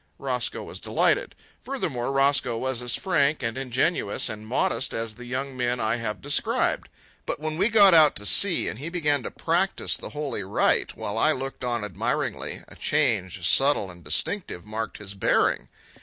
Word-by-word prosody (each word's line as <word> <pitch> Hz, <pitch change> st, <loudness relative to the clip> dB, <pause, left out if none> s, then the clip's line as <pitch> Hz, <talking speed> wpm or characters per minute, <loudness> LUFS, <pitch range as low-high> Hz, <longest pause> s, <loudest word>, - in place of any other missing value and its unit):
Roscoe -, -, -2 dB
was -, -, -9 dB
delighted. -, -, 0 dB, 0.3 s
Furthermore, 135 Hz, -, -3 dB
Roscoe 135 Hz, -3 st, +2 dB
was 130 Hz, 0 st, -1 dB
as 120 Hz, -1 st, +1 dB
frank 155 Hz, -6 st, +1 dB
and 115 Hz, -1 st, -2 dB
ingenuous 130 Hz, -, 0 dB
and 110 Hz, -1 st, -7 dB
modest 130 Hz, +2 st, 0 dB
as 115 Hz, -1 st, -3 dB
the 125 Hz, +2 st, -11 dB
young 130 Hz, +2 st, -4 dB
men 125 Hz, -1 st, -1 dB
I 110 Hz, +1 st, 0 dB
have 110 Hz, -2 st, -5 dB
described. 145 Hz, +1 st, 0 dB, 0.4 s
But -, -, -1 dB
when 155 Hz, 0 st, -3 dB
we 185 Hz, +7 st, +2 dB
got 205 Hz, -4 st, +7 dB
out 155 Hz, -3 st, +6 dB
to 105 Hz, -, -5 dB
sea 185 Hz, -, +4 dB
and 110 Hz, -, -5 dB
he 150 Hz, +5 st, -5 dB
began 150 Hz, -5 st, +1 dB
to -, -, -5 dB
practise 175 Hz, +4 st, +1 dB
the -, -, -7 dB
holy 145 Hz, -7 st, -4 dB
rite, 95 Hz, +2 st, +1 dB
while 105 Hz, +2 st, -3 dB
I 155 Hz, +6 st, +4 dB
looked 135 Hz, -1 st, -6 dB
on 120 Hz, -3 st, -1 dB
admiringly, 105 Hz, -, -3 dB
a -, -, -14 dB
change, 90 Hz, -1 st, 0 dB
subtle 135 Hz, -9 st, +3 dB
and 85 Hz, -1 st, -15 dB
distinctive, 90 Hz, -, -1 dB
marked 110 Hz, 0 st, -5 dB
his 100 Hz, -2 st, -8 dB
bearing. 95 Hz, -, +1 dB
130 Hz, 175 wpm, -25 LUFS, 110-150 Hz, 0.4 s, got